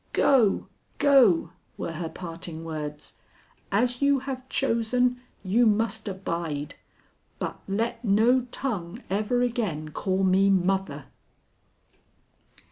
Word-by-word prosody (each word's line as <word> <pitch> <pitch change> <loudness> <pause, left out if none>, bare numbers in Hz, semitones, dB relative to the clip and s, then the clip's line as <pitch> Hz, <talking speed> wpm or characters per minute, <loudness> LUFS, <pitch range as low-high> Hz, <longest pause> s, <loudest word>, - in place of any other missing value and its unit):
'Go! 235 -8 +3 0.3
go!' 250 - +5 0.3
were - - -4
her 165 0 -4
parting 165 -2 -7
words. 150 -2 -6 0.5
'As 245 +5 +1
you 280 0 +4
have 260 -1 -6
chosen, 245 0 +1 0.2
you 225 +5 +3
must 220 +1 +1
abide. 170 -6 -4 0.6
But - - -4
let 230 +4 -2
no 225 +4 +4
tongue 200 -11 -4
ever 215 +5 +1
again 205 -11 -2
call 190 +3 -1
me 190 +1 +4
mother.' 190 -6 0
200 Hz, 105 wpm, -26 LUFS, 170-245 Hz, 0.6 s, go